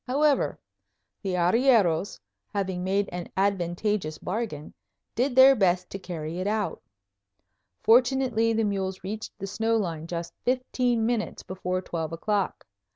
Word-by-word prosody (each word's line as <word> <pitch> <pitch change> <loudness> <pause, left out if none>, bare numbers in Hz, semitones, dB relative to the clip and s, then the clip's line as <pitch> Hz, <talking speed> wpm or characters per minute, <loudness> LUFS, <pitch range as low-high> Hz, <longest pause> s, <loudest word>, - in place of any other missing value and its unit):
However, 285 +2 +2 0.6
the 190 -3 -2
arrieros, 190 -2 +3 0.3
having 190 -3 -2
made 195 +2 +1
an 175 -1 -5
advantageous 190 -2 0
bargain, 185 -8 -4 0.4
did 250 +2 0
their 265 +1 +8
best 185 -4 +1
to 195 - -5
carry 170 -2 -5
it 185 - -2
out. 210 -1 -1 1.0
Fortunately 245 -1 +4
the 225 0 +1
mules 190 -3 -2
reached 215 +3 -6
the 195 - -5
snow 225 +3 0
line 165 -6 -3
just 170 0 -5
fifteen 250 -2 +1
minutes 230 -2 -2
before 185 0 -3
twelve 165 -3 -4
o'clock. 200 +3 -1
200 Hz, 130 wpm, -26 LUFS, 180-230 Hz, 1.0 s, their